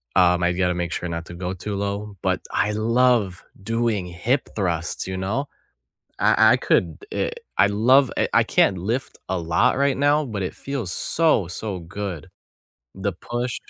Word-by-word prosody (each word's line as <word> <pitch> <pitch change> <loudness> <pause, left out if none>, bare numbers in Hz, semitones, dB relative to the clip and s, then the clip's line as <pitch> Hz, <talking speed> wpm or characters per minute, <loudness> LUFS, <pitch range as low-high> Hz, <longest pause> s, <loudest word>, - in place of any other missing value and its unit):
Um, 90 0 +4
I've 90 +1 +1
gotta 90 -1 +1
make 85 -1 -2
sure 90 - -3
not 85 0 -4
to 85 - -10
go 90 +1 -4
too 100 +3 -5
low. 100 +1 -3
But - - 0
I 105 - +1
love 115 -3 +2 0.2
doing 115 -2 0
hip 90 +10 -1
thrusts, 85 -4 -2
you 95 0 -4
know, 110 +10 -2 0.7
I - - +5
I - - +4
could, - - +1
eh - - -1 0.3
I - - +5
love, 125 +6 +4
eh - - +1
I - - +4
can't 95 - +2
lift 115 +9 -3
a 95 - -1
lot 85 +11 +2
right 140 -1 +2
now, 145 +2 +3
but 105 -6 -4
it 90 - -4
feels 135 -10 -4
so, 155 - +2
so 95 +1 -4
good. 90 -1 -6 0.7
The 95 +1 -2
push 120 +7 -4
100 Hz, 175 wpm, -23 LUFS, 90-120 Hz, 0.7 s, I